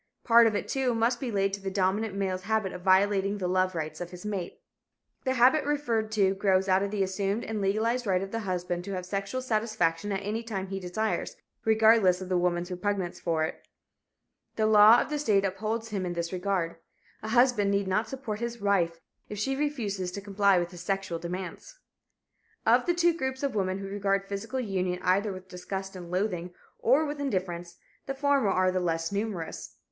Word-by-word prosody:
Part 235 0 +7
of 220 - 0
it, - - -2
too, 260 -3 0
must 235 +2 +1
be 260 - -3
laid 195 -2 0
to 200 - -4
the 195 - -3
dominant 195 +2 0
male's 190 -2 -1
habit 215 -1 -1
of 180 - -7
violating 195 +1 +3
the 185 -3 -2
love 185 0 +1
rights 155 0 -4
of 175 - -4
his 180 +3 -10
mate. 195 -4 -4 0.7
The 260 0 +1
habit 260 +5 +5
referred 240 -7 -1
to 195 -3 +3
grows 190 -1 +2
out 190 0 +3
of 200 - -1
the 200 -1 0
assumed 195 +3 -1
and 220 -2 -3
legalized 220 +5 0
right 185 -1 +2
of 195 - -7
the 230 - -2
husband 180 -3 -3
to 200 - -4
have 180 -1 -4
sexual 200 +7 -3
satisfaction 215 -6 0
at 195 0 -1
any 215 +3 -2
time 195 -5 -4
he 195 0 -3
desires, 195 +4 -2 0.3
regardless 220 -4 +5
of 185 -1 -7
the 185 - +2
woman's 175 0 0
repugnance 185 0 -2
for 165 -2 0
it. 160 - -5 0.9
The 220 - +1
law 215 +2 +8
of - - -4
the 300 - -1
state 205 -8 +2
upholds 215 +4 -2
him 200 -3 -2
in 175 -1 -2
this 170 +1 -3
regard. 180 -3 -1 0.4
A 215 - -6
husband 240 -3 +3
need 200 -1 +1
not 215 +4 0
support 235 -5 -5
his 235 0 -4
wife 180 -5 +1 0.3
if 210 - -6
she 270 +6 -1
refuses 220 -11 -2
to 200 - -4
comply 200 -1 +3
with 175 0 -1
his 175 -2 -9
sexual 195 -2 -2
demands. 180 - -6 0.9
Of - - +4
the 350 - +2
two 345 -1 +3
groups 265 -3 -3
of 275 -2 0
women 190 -2 0
who 195 - -6
regard 195 0 -1
physical 220 +6 -4
union 185 -6 -1
either 200 +3 +2
with 185 0 -9
disgust 190 +1 -6
and 175 -2 -8
loathing, 180 -2 -2 0.2
or 275 +7 +3
with 290 0 -4
indifference, 180 -8 -3 0.3
the 270 - -3
former 280 -5 +2
are 185 -1 +2
the 185 - 0
less 165 -1 -1
numerous. 200 -5 -4
200 Hz, 205 wpm, -28 LUFS, 185-225 Hz, 0.9 s, law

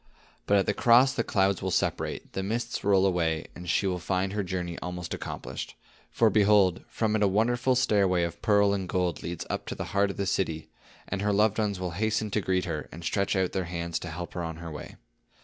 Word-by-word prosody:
"But 100 - +4
at 95 - +2
the 105 - +1
cross, 125 +5 +5
the 115 - 0
clouds 95 -3 +1
will 95 - -1
separate, - - -2
the 95 - -2
mists 110 +5 -3
roll 100 -1 +4
away, 85 -4 +1
and 90 -1 -8
she 100 - +2
will 90 -2 0
find 95 +2 -1
her 105 - 0
journey 90 -2 -4
almost 90 -1 -5
accomplished. - - -6 0.3
For 115 -2 +3
behold, 100 -4 +4
from 110 -1 -1
it 110 - +1
a 100 - +5
wonderful 120 +6 +2
stairway 100 -8 +3
of 85 0 -4
pearl 100 -1 +4
and 95 -2 -3
gold 90 -3 0
leads 85 -1 -5
up - - -3
into - - -4
the - - -4
heart 100 0 +3
of 100 - -6
the 100 - -1
city; 80 -5 -1 0.4
and 95 0 -3
her 105 0 +1
loved 105 +1 +2
ones 100 -3 0
will 90 -1 -3
hasten 110 +3 -1
to 105 - +1
greet 95 -1 0
her, 80 -4 -4
and 85 +2 -9
stretch 100 +4 0
out 95 -1 +1
their 95 -2 -2
hands 85 0 -3
to 90 - -6
help 85 +2 -6
her 90 - -3
on 80 -1 -4
her 85 0 -8
way. 75 - -8
95 Hz, 230 wpm, -28 LUFS, 90-105 Hz, 0.4 s, cross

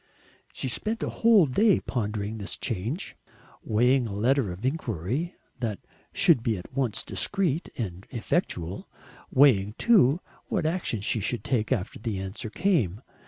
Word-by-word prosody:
She - - -2
spent 220 - -1
a - - -2
whole 225 -6 +7
day 200 - +3
pondering 105 -2 -3
this 100 - -3
change, 115 - -3 0.5
weighing 125 +3 +3
a 100 - -5
letter 120 0 +2
of 90 +7 -7
inquiry 130 - -2 0.2
that 110 -5 -2 0.3
should 120 - +4
be 115 -2 0
at 90 +8 -11
once 130 -5 -1
discreet 175 -5 -1
and 95 -5 -5
effectual, 100 - -2 0.4
weighing 110 -7 +4
too 180 - +5 0.3
what - - -1
action 160 - -1
she 110 - 0
should 115 +4 -2
take 115 -4 0
after 105 -7 -1
the 110 -3 -3
answer 95 +4 -5
came. 125 - 0
120 Hz, 145 wpm, -27 LUFS, 105-145 Hz, 0.5 s, whole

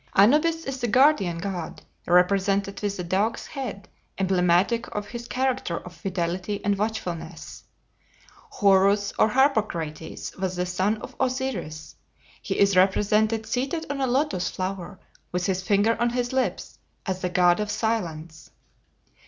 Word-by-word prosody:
Anubis 305 +11 +4
is 270 -1 -4
the 240 - 0
guardian 225 - +4
god, 180 -2 -5 0.2
represented 195 +2 +2
with 205 -1 -2
a 180 - -3
dog's 195 +6 0
head, 235 -9 -6 0.3
emblematic 190 +4 +2
of 210 0 -4
his 240 0 -7
character 255 -9 -1
of 180 - -9
fidelity 185 +1 -3
and 205 0 +2
watchfulness. 200 -5 -5 0.8
Horus 200 - +3
or - - +6
Harpocrates 210 - -1
was 185 -1 -2
the 180 0 -1
son 185 +4 0
of - - -9
Osiris. 255 - -3 0.4
He - - -3
is 200 -1 +4
represented 210 +4 +3
seated 275 +8 -2
on 280 -1 -3
a 265 - +1
Lotus 255 -7 0
flower, 185 0 -5 0.3
with 180 0 -1
his 190 -1 0
finger 205 +3 +2
on 240 - +3
his 245 +1 -2
lips, 260 -1 -2 0.3
as 185 -1 -3
the 180 - -1
god 175 0 +3
of 210 -1 -2
Silence. 165 -9 -3
200 Hz, 140 wpm, -25 LUFS, 180-240 Hz, 0.8 s, or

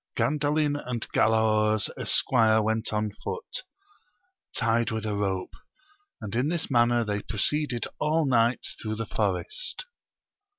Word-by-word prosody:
Gandalin 150 0 +1
and 120 -2 -3
Galaor's 110 -1 +3
esquire 110 -3 +3
went 110 +1 0
on 105 -1 -1
foot, 470 - -6 0.9
tied 115 0 +2
with 110 -1 -3
a 105 - -1
rope, 95 -2 -2 0.7
and 105 -2 -6
in 125 +4 +2
this 165 -2 -2
manner 120 -1 +4
they 105 -1 -2
proceeded 125 +3 0
all 155 +1 +2
night 120 -2 +2 0.2
through 110 -1 -3
the 115 +1 -3
forest. 110 - -2
115 Hz, 125 wpm, -27 LUFS, 110-145 Hz, 0.9 s, manner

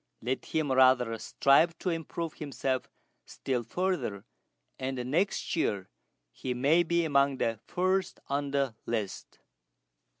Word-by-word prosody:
Let 130 +3 -2
him 155 -3 -1
rather 130 -3 +5
strive 160 +5 +3
to 180 - -1
improve 165 0 -4
himself 135 -3 -3 0.3
still 130 -3 -3
further, 170 - -2 0.5
and 130 0 -3
next 180 +5 0
year 100 - -1 0.4
he 125 - -4
may 145 +7 +4
be 170 0 +1
among 140 -2 +3
the 115 -3 -1
first 185 +1 0
on 140 +1 -1
the 140 -3 0
list." 110 -4 -3
140 Hz, 125 wpm, -30 LUFS, 125-165 Hz, 0.5 s, rather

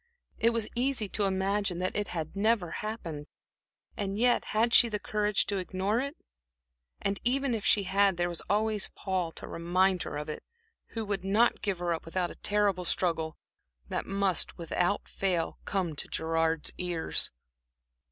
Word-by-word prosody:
It 230 - +5
was 230 -2 -1
easy 245 -3 0
to 205 - 0
imagine 195 -1 0
that 185 +1 -2
it 205 -1 0
had 160 0 -4
never 205 -3 +2
happened. 165 -9 -5 0.7
And 200 -1 -3
yet, 240 +2 +3
had 230 +2 +1
she 235 - +8
the 210 - -1
courage 210 0 +1
to 200 - -1
ignore 190 +4 0
it?... 280 +5 -3 0.9
And, 200 0 0
even 265 +1 +2
if 220 -3 -2
she 205 - +4
had, 195 0 +3
there 175 0 +1
was 175 -1 -3
always 210 0 +1
Paul 185 -4 -1
to - - -8
remind 180 +2 +1
her - - -4
of 150 - -4
it, 155 - -5 0.5
who 225 - -1
would 200 -2 -2
not 210 +5 +3
give 200 -3 0
her 175 -1 0
up 165 - -4
without 175 +1 -2
a - - -10
terrible 205 -3 +2
struggle, 165 -2 0 0.5
that - - -2
must, 195 -2 +1
without 175 +3 0
fail, 180 -4 -1
come 180 -5 -1
to - - -1
Gerard's 165 -1 0
ears. 175 -2 +2
195 Hz, 170 wpm, -30 LUFS, 175-210 Hz, 0.9 s, she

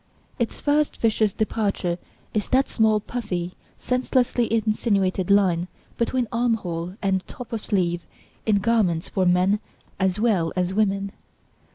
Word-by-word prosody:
Its 235 - -1
first 295 0 +1
vicious 220 -2 +2
departure 200 -5 -1 0.3
is 210 -2 -1
that 265 +1 +3
small 220 -2 +3
puffy, 185 -6 -4 0.2
senselessly 250 -2 +1
insinuated 205 -4 +1
line 185 -4 +3 0.3
between 240 +1 0
arm 235 0 +2
hole 175 -3 -5
and 190 -1 +1
top 250 -2 -9
of 220 - -3
sleeve 175 -3 0 0.4
in 215 - +4
garments 200 -6 +1
for 185 -1 +1
men 185 +3 +3 0.4
as 190 +1 +1
well 200 -8 +2
as 180 0 0
women. 200 -1 +1
205 Hz, 135 wpm, -24 LUFS, 185-230 Hz, 0.4 s, in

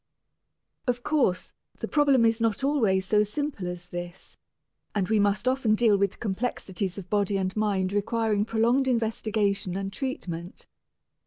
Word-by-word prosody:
Of 245 0 0
course, 265 -12 +1 0.3
the - - -4
problem 280 -5 +4
is 225 0 +2
not 225 +2 0
always 220 -10 +2
so 210 +2 +3
simple 215 -2 -3
as 180 0 -6
this, 175 +1 -8 0.6
and 195 -3 +1
we 220 -1 +2
must 205 +4 +1
often 255 -4 +2
deal 220 -2 +4
with 200 -1 0
complexities 195 -3 -3
of 190 -3 -7
body 205 0 +1
and 185 -1 -2
mind 200 -3 0
requiring 210 0 +1
prolonged 230 +4 +2
investigation 215 -5 0
and 195 0 -4
treatment. 185 - -5
210 Hz, 145 wpm, -27 LUFS, 190-235 Hz, 0.6 s, problem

